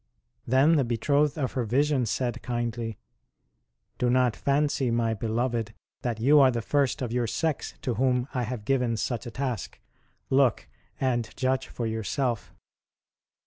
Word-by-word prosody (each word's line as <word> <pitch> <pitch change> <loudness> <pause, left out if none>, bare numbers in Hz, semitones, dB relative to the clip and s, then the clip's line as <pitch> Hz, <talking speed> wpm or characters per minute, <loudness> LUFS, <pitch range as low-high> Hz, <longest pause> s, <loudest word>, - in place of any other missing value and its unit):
Then 140 +6 +4
the 140 - +3
Betrothed 140 +6 +1
of 135 -4 -1
her 125 - -1
vision 130 +2 +1
said 120 +1 -2
kindly: 120 -2 -3 0.5
" - - -49
Do 125 - +2
not 125 -2 +3
fancy, 140 -2 +1
My 115 -1 +1
beloved, 115 0 -2 0.3
that 120 -3 -2
you 145 +6 +6
are 135 -2 +7
the 120 -3 -2
first 140 -1 +1
of 120 - -3
your 120 -1 0
sex 160 +5 -2
to 125 - 0
whom 125 +1 +1
I 125 - 0
have 120 -2 -4
given 125 -3 +1
such 120 +2 -2
a - - -4
task: 125 -2 -4 0.5
look! 135 -3 +3 0.3
and 120 -4 0
judge 130 0 0
for 120 - -4
yourself." 115 +1 -2
125 Hz, 155 wpm, -27 LUFS, 115-135 Hz, 0.5 s, are